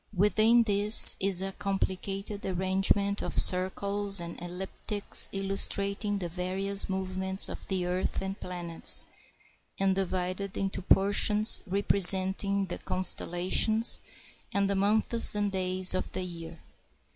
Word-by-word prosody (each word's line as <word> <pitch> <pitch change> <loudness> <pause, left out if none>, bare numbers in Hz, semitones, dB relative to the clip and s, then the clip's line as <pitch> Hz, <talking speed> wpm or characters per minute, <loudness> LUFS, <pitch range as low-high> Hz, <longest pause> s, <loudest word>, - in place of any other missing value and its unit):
Within 215 +5 +2
this 210 0 +7
is 190 -1 +1
a 195 - -6
complicated 195 +1 -6
arrangement 190 +2 -2
of - - -7
circles 200 +2 +2
and 170 0 -9
elliptics, 190 +3 -1
illustrating 200 +1 -3
the 180 -3 -6
various 190 +3 -4
movements 190 0 -3
of - - -11
the 185 -2 -3
earth 180 +1 -4
and 195 +1 -7
planets, 175 -2 -4 0.7
and 195 0 0
divided 185 +1 -5
into 195 -1 -5
portions 205 +3 +2
representing 195 0 +4
the 175 - -8
con 185 - -6
stellations, 185 +6 0 0.5
and 200 0 -1
the 200 - -3
months 215 +3 +4
and 205 -1 -3
days 185 -1 +2
of 185 - -5
the 185 - -4
year. 170 -2 -10
195 Hz, 120 wpm, -26 LUFS, 185-200 Hz, 0.7 s, this